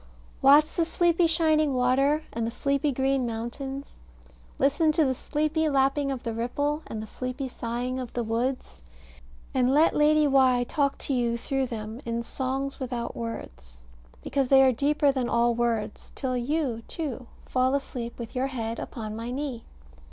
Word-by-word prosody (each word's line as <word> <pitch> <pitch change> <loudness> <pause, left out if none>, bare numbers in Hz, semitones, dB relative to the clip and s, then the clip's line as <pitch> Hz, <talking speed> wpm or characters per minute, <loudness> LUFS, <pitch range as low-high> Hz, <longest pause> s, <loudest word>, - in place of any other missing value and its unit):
Watch 290 +3 +6
the 340 - +1
sleepy 340 +1 +2
shining 310 -3 +2
water, 270 +5 +2
and 230 -1 -1
the - - -1
sleepy 280 +4 0
green 265 -1 +1
mountains. 265 +5 -5 0.6
Listen 290 +4 +3
to 315 -1 +3
the 260 - +1
sleepy 310 +4 0
lapping 275 0 +2
of 265 -3 -4
the 230 - -3
ripple, 285 +6 -1
and 215 -1 -5
the - - -6
sleepy 255 +4 -5
sighing 245 +1 -3
of 250 -2 -5
the 240 - -1
woods, 230 - -2 0.7
and 255 -1 +3
let 305 +4 +4
Lady 300 0 +4
Why 260 -3 +4
talk 280 +2 0
to 280 - -1
you 235 -2 +1
through 270 +2 -1
them 220 +1 -6
in 235 0 -2
"songs 270 +3 -3
without 245 -3 -4
words," - - -7 0.4
because 270 -3 0
they 270 -1 +7
are 260 - +5
deeper 285 +3 +2
than 260 -3 -1
all 235 0 +3
words, 230 -3 -2
till 260 -2 -2
you, 250 -2 -1
too, 270 -6 -4 0.2
fall 255 +1 +1
asleep 245 -4 -4
with 235 0 -8
your 260 +2 +1
head 230 -4 -4
upon 215 -3 -6
my 230 +2 -5
knee. 260 -2 -4
260 Hz, 165 wpm, -27 LUFS, 235-285 Hz, 0.7 s, they